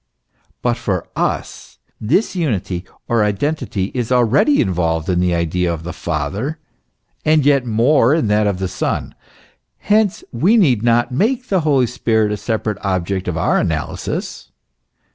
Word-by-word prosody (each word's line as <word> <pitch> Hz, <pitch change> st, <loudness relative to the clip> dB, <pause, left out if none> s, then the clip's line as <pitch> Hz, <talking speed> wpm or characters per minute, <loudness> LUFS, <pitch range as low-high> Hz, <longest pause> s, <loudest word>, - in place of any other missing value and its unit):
But 120 Hz, -1 st, +1 dB
for 90 Hz, -4 st, -2 dB
us -, -, -3 dB, 0.2 s
this 160 Hz, -, +1 dB
unity 100 Hz, -, -2 dB, 0.2 s
or 115 Hz, -2 st, +2 dB
identity 105 Hz, -2 st, -1 dB
is 125 Hz, -2 st, -3 dB
already 125 Hz, -, +3 dB
involved 85 Hz, -4 st, 0 dB
in 90 Hz, -1 st, +1 dB
the 90 Hz, -1 st, +1 dB
idea 85 Hz, +1 st, 0 dB
of 80 Hz, -1 st, -5 dB
the 90 Hz, -, -6 dB
Father, 85 Hz, -, -3 dB, 0.7 s
and 155 Hz, -2 st, +3 dB
yet 140 Hz, -3 st, +3 dB
more 120 Hz, +4 st, +3 dB
in 160 Hz, -, +1 dB
that 105 Hz, 0 st, +2 dB
of 100 Hz, -3 st, 0 dB
the 95 Hz, 0 st, -2 dB
Son. 90 Hz, 0 st, -3 dB, 0.6 s
Hence 210 Hz, 0 st, +1 dB
we 175 Hz, -, +3 dB
need 135 Hz, -, +3 dB
not 120 Hz, +1 st, +2 dB
make 235 Hz, -, 0 dB
the 190 Hz, -3 st, +2 dB
Holy 140 Hz, -5 st, +3 dB
Spirit 110 Hz, -2 st, 0 dB
a 105 Hz, -, -2 dB
separate 105 Hz, 0 st, -3 dB
object 95 Hz, -1 st, -1 dB
of 85 Hz, -3 st, -2 dB
our -, -, +2 dB
analysis. -, -, -3 dB
110 Hz, 150 wpm, -18 LUFS, 95-145 Hz, 0.7 s, already